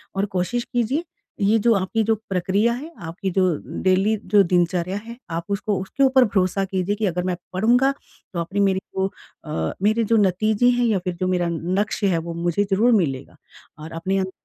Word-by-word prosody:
और 195 +1 +1
कोशिश 235 +7 0
कीजिए, 250 +7 0 0.4
ये 210 +3 +4
जो 230 +2 +4
आपकी 195 +3 0
जो 225 +1 +2
प्रक्रिया 195 +5 +1
है, 300 +7 -7
आपकी 175 +3 -4
जो 185 - +5 0.4
डेली 190 +3 +3 0.2
जो 200 -1 +7
दिनचर्या 180 +1 0
है 235 +1 -9
आप 165 +1 -2
उसको 200 -1 -1
उसके 275 +8 -1
ऊपर 260 -1 +5
भरोसा 195 -2 0
कीजिए 190 +1 -1
कि 215 0 -1
अगर 180 0 -1
मैं 180 -1 -1 0.2
पढ़ूँगा 245 +8 +3 0.4
तो 170 - -2
अपनी 190 +4 -3
मेरे 190 0 0 0.2
को 190 0 +1 0.4
अ, 80 0 -2
मेरे 220 +2 +3
जो 225 +1 +3
नतीजे 215 +4 +3
हैं 240 - +3
या 205 -4 +2
फिर 180 -1 -4
जो 185 - +1
मेरा 180 -2 +1
लक्ष्य 185 +5 -1
हैं 170 - +2
वो - - -3
मुझे 175 +3 0
ज़रूर 225 +6 +4
मिलेगा। 140 -10 -1 0.4
और 155 +2 -8
अपने 190 +4 -1
अंदर 190 0 -1
195 Hz, 195 wpm, -22 LUFS, 180-220 Hz, 0.4 s, जो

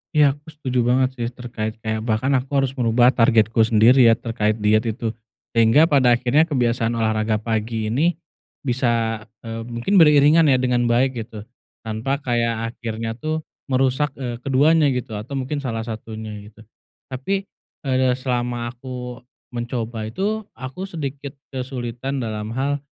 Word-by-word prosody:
Ya, 145 -2 +6
aku 150 - -41
setuju 130 -4 -2
banget 130 +1 +3
sih. 120 - -1
Terkait 120 -3 -5
kayak, 110 0 -1
bahkan 115 +4 0
aku 130 - -3 0.2
harus 135 - -1
merubah 120 +1 +4
targetku 115 -2 +3
sendiri 115 +3 +6
ya, 115 - +6
terkait 110 -2 -1
diet 105 +1 +3
itu. 110 0 -2 0.4
Sehingga 115 +6 +5
pada 130 -4 +5
akhirnya 125 +7 +2
kebiasaan 120 -5 0
olahraga 110 -1 +1
pagi 110 0 -2
ini 160 +9 +2 0.5
bisa, 115 -4 0 0.2
eee, 115 0 -5
mungkin 120 +12 +1
beriringan 150 +1 +6
ya 135 - +5
dengan 125 -1 +1
baik, 125 +1 +2
gitu. 105 -2 -9 0.4
Tanpa 115 +5 -2
kayak 115 -1 -1
akhirnya 115 -1 -4
tuh 155 +3 -2 0.2
merusak, 135 +2 +1
eee, 120 -3 -5
keduanya 145 +4 +3
gitu 125 -2 -4
atau 130 +6 -7
mungkin 135 +2 -2
salah 115 -5 -3
satunya, 110 -1 -7 0.2
gitu. 110 +1 -16 0.5
Tapi, 195 +10 -2 0.4
eee, 130 -2 +2
selama 120 -2 -2
aku 125 0 -8 0.3
mencoba 120 -2 -4
itu, 205 - -2
aku 130 +8 -7
sedikit 140 -4 -6 0.2
kesulitan 130 0 -4
dalam 110 -1 -4
hal, 140 +2 0
120 Hz, 145 wpm, -22 LUFS, 115-135 Hz, 0.5 s, Ya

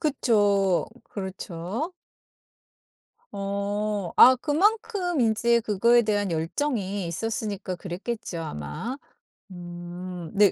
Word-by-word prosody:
그쵸. 205 - +2 0.2
그렇죠. 190 - -5 1.4
어. 200 -1 -2
아 260 +1 +9
그만큼 360 - +1
인제 235 +1 +3
그거에 230 +3 +4
대한 205 -3 0
열정이 195 - -1
있었으니까 200 +1 -3
그랬겠죠 185 +2 -5
아마. 155 - -5 0.6
음 175 0 -8 0.3
네 205 -2 +5
205 Hz, 190 characters per minute, -26 LUFS, 185-235 Hz, 1.4 s, 아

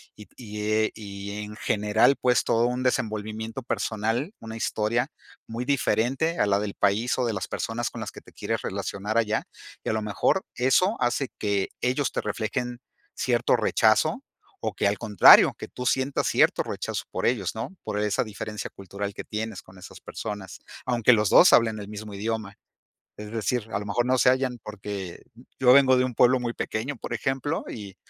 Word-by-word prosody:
y 105 - -12
t 110 -1 -2
y 100 -2 -7
e 105 +1 -5
en 105 0 -8
general, 105 +6 +3
pues, 125 -1 +3
todo 115 +1 +2
un 125 +1 -2
desenvolvimiento 110 0 -2
personal, 115 - -2
una 110 0 -8
historia 110 +1 0 0.4
muy 115 +2 -4
diferente 135 +3 +1
a 105 - +3
la 100 0 +2
del 105 -1 -3
país 105 +5 +1
o 125 - +2
de 115 - -1
las 100 - -3
personas 115 +1 -3
con - - -7
las - - -5
que - - -12
te - - -19
quieres - - -3
relacionar 105 +3 -3
allá, 110 -2 0 0.4
y - - -3
a - - +1
lo 110 - -1
mejor 105 - +1
eso 160 - +3
hace 120 +2 0
que 100 -2 0
ellos 130 +3 0
te - - -2
reflejen 115 +3 -3 0.4
cierto - - +2
rechazo, - - +2 0.4
o - - -2
que - - +1
al 100 - -2
contrario, 105 -5 +7
que - - -7
tú 125 - -7
sientas 130 +2 +1
cierto - - +3
rechazo - - -4
por - - -2
ellos, 100 -7 0
¿no?, 115 +12 -5
por 105 - -3
esa 105 -1 +1
diferencia 105 -1 -6
cultural 100 +1 -6
que - - -7
tienes 110 -1 -5
con 95 +1 -17
esas 90 0 -12
personas, 105 -4 -7 0.3
aunque 120 -1 +4
los 105 -3 +2
2 180 - +7
hablen 110 -2 +4
el 100 - -7
mismo 105 0 -8
idioma, 105 0 -3 0.6
es 105 0 -8
decir, 115 +1 -1
a 100 - 0
lo 105 - -7
mejor 110 +4 0
no 130 0 +3
se 125 - +5
hallan 130 -1 -1
porque 100 -3 -6 0.4
yo 125 -1 +6
vengo 130 -1 +6
de 125 - +3
un 125 -2 -5
pueblo 125 +2 +5
muy 120 -1 -3
pequeño, 120 +7 -3
por - - -6
ejemplo, 135 +6 -1
y 100 -3 -8
110 Hz, 190 wpm, -26 LUFS, 105-125 Hz, 0.6 s, contrario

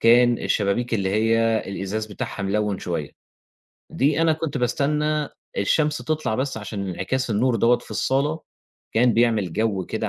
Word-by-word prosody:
كان 120 +1 +5
الشبابيك 110 +4 0
اللي 95 -3 0
هي 115 +1 +2
الإزاز 100 +3 -3
بتاعها 105 -1 -5
ملوِّن 105 0 0
شوية، 80 -4 -3 0.8
دي 145 +4 +1
أنا 165 -1 +4
كنت 155 -2 -3
باستنّى 150 +4 0 0.3
الشمس 150 +9 +2
تطلَع 155 -8 -1
بس 130 -1 -2
عشان 100 -2 -5
انعكاس 120 +9 -2
النور 115 +3 +2
دوّة 120 +2 +4
في - - -16
الصالة، 145 +4 0 0.5
كان 120 +1 +4
بيعمل 110 -6 +2
جَو 100 -3 0
كده - - -2
115 Hz, 150 wpm, -23 LUFS, 105-135 Hz, 0.8 s, كان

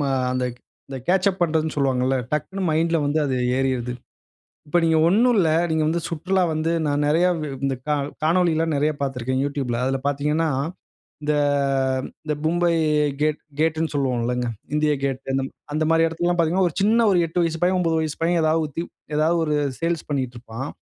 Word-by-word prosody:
ம - - 0 0.3
அந்த 130 0 0 0.6
catch 185 +2 +3
up 185 - -10
பண்றதுனு 160 -1 0
சொல்லுவாங்களா. 130 -2 +1 0.2
டக்குன்னு 190 +6 -2
மைண்ட்ல 165 +1 +2
வந்து 145 +2 +1
அது 135 -2 -1 0.2
ஏறிடுது. 130 -2 -1 0.8
இப்போ 160 - +1
நீங்க 165 -1 +3
ஒண்ணும் 235 +7 +4
இல்ல 170 -4 +3 0.2
நீங்க 160 -1 +1
வந்து 170 +2 0
சுற்றுலா 185 +3 0
வந்து 155 +1 0 0.2
நான் 145 0 +1
நிறைய 165 +4 +3 0.4
இந்த 135 -1 0
க - - +1 0.3
காணொளிலாம் 165 -1 +2
நிறைய 150 +2 +2
பார்த்திருக்கிறேன் 130 -1 -1
Youtubeல. 135 -4 -2
அதில 135 +1 0
பார்த்தீங்கன்னா, 150 +3 0 0.7
இந்த 150 - +1 0.9
இந்த 150 - 0
மும்பை 170 +2 +2 0.5
கேட் 155 0 +1 0.2
கேட்னு 160 0 +1
சொல்லுவோம் 130 -4 0
இல்லங்க? 125 0 -1 0.3
இந்தியா 150 0 +2
கேட் 135 -1 -2 0.5
அந்த 155 - +1
மாரி 165 0 +4
இடத்திலலாம் 175 +2 -1
பார்த்தீங்கன்னா 175 +3 +2
ஒரு 155 - -14
சின்ன 225 +2 +4
ஒரு 185 - +3
8 170 +2 -1
வயசு 165 -1 -2
பையன் 185 +1 +3
9 165 -2 +1
வயசு 155 -2 -3
பையன் 170 +1 +2
ஏதாவது 160 +1 +2
வுத் 155 +3 -4 0.3
ஏதாவது 160 +3 +2
ஒரு 150 - 0 0.2
சேல்ஸ் 165 -1 -2
பண்ணிட்டு 130 -4 -2
இருப்பான். 120 +3 -7
155 Hz, 165 wpm, -23 LUFS, 140-170 Hz, 0.9 s, ஒண்ணும்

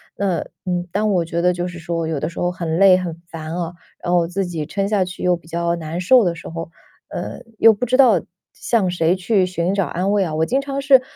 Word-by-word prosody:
那， 190 -4 0 0.3
嗯， 180 -1 -2
当 215 +1 +1
我 175 -4 +1
觉 170 +1 -2
得 180 0 +4
就 175 0 -3
是 175 -1 -8
说 165 -1 -3
有 160 -2 -2
的 155 - -1
时 165 - -9
候 175 - +1
很 170 -2 -3
累、 195 -1 +7
很 170 -2 -5
烦 160 0 -6
啊， 175 -1 -3 0.3
然 175 - -1
后 175 -1 +4
自 190 +2 -2
己 165 -4 -4
撑 195 +4 -2
下 205 -3 +2
去 180 0 -8
又 180 -1 +3
比 170 - -14
较 170 +1 -1
难 165 +1 -5
受 235 +6 +5
的 175 -2 +1
时 - - -10
候， 165 0 -6 0.4
呃， - - -6 0.2
又 225 -1 +7
不 230 +5 -2
知 255 +2 +2
道 230 -10 +6 0.3
向 215 -6 0
谁 175 -1 +2
去 190 0 +2
寻 180 +1 -1
找 195 -3 +1
安 185 +3 -1
慰 200 -2 +3
啊。 160 -3 -3
我 160 +1 +2
经 265 +7 +1
常 275 0 -4
是 270 -2 +6
180 Hz, 270 characters per minute, -20 LUFS, 170-195 Hz, 0.4 s, 累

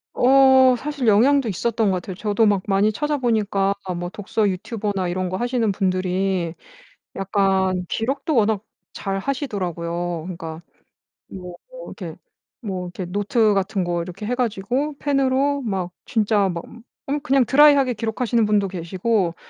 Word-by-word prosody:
어 265 0 +6
사실 285 -2 -3
영향도 245 +4 +4
있었던 220 +2 0
것 190 - +1
같아요. 180 +1 -5
저도 210 +3 +1
막 205 -3 +2
많이 200 +2 +3
찾아 295 +6 -1
보니까 210 -6 +1 0.2
뭐 175 0 -4
독서 205 +2 -1
유튜버나 200 0 -2
이런 185 +1 -2
거 185 - -3
하시는 240 -1 0
분들이 185 -2 -1 0.6
약간 190 -2 +1
기록도 270 - -2
워낙 215 -3 +2 0.3
잘 195 -1 -3
하시더라고요. 175 - -3
그니까 165 -3 -7 0.7
뭐 180 -2 -8 0.3
이렇게 - - -8 0.5
뭐 190 -5 -4
이렇게 180 +1 -6
뭐 175 - -10
노트 205 +2 +2
같은 195 0 0
거 175 -1 -1
이렇게 180 +4 -7
해 240 - -1
가지고 245 +5 -1
펜으로 275 0 +1
막 190 -7 -3
진짜 210 -3 +1
막 170 -2 -4 0.4
음 285 +2 -1
그냥 275 -3 +3
드라이하게 280 -1 +5
기록하시는 230 +1 0
분도 205 -2 +2
계시고 185 +1 -1
205 Hz, 315 characters per minute, -22 LUFS, 185-245 Hz, 0.7 s, 어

